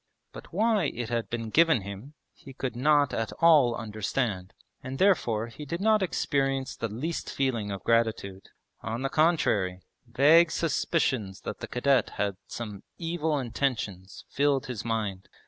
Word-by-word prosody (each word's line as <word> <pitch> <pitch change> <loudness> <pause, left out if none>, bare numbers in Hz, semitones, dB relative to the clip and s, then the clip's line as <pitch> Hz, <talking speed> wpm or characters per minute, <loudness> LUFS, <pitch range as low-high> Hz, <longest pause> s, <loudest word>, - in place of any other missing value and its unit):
But - - -11
why 210 0 +2
it 120 -4 -3
had 115 -1 -2
been 115 -2 -4
given 160 -5 +4
him 100 +9 -9 0.2
he 135 - -13
could 130 -2 -4
not 145 +2 +3
at 115 - -2
all 150 -8 +5
understand, 105 -3 -3 0.3
and 130 +1 -6
therefore 120 - +2
he 115 +6 -10
did 165 +4 -4
not 215 +1 +3
experience 135 -6 -1
the 115 - -3
least 135 +11 -4
feeling 120 -6 -1
of 100 -1 -5
gratitude. 110 -4 0 0.3
On 115 +4 -4
the 135 - 0
contrary, 105 - +1 0.3
vague 150 +7 +5
suspicions 130 - -1
that - - -6
the - - -6
cadet 135 +2 +2
had 100 -1 0
some 105 -4 -7 0.2
evil 165 -2 -1
intentions 115 -7 -3
filled 140 -1 +1
his 125 -5 -5
mind. 105 -5 -3
125 Hz, 150 wpm, -27 LUFS, 110-150 Hz, 0.3 s, all